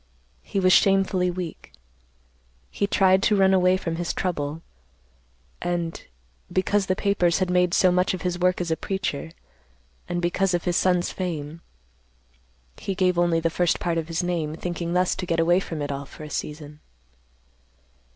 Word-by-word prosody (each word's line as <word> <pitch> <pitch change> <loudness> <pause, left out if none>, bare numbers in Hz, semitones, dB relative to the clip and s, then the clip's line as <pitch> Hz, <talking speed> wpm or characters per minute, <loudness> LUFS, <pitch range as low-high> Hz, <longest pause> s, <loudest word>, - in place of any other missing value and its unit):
He 195 - -3
was 185 -1 +4
shamefully 195 -2 +3
weak. 175 - -6 1.0
He 200 - -1
tried 190 -1 +4
to 210 - +3
run 190 -1 +4
away 185 0 +4
from 165 -3 -4
his 175 -1 -3
trouble, 160 -3 -3 1.0
and, 170 -2 -3 0.5
because 190 +1 +1
the 185 - +1
papers 190 -4 +1
had 185 -2 0
made 180 -1 +2
so 185 - +4
much 180 +1 +1
of 180 - -8
his 180 -1 -2
work 180 0 +2
as 175 -2 -2
a - - +2
preacher, 185 -5 -3 0.8
and 175 - -1
because 180 +2 +1
of 175 - -2
his 175 - 0
son's 180 -1 +2
fame, 165 -3 -5 1.2
he 195 - -4
gave 180 -1 +2
only 175 -1 +2
the 165 0 0
first 175 0 +1
part 170 -1 0
of 160 - -5
his 165 +1 -2
name, 165 -4 -2
thinking 170 0 -4
thus 180 0 +2
to 180 - -5
get 165 -1 0
away 175 +2 +4
from 160 -5 -5
it 145 - -3
all 140 0 -5
for 155 - -11
a 150 - -9
season. 150 0 -6
175 Hz, 170 wpm, -24 LUFS, 165-185 Hz, 1.2 s, was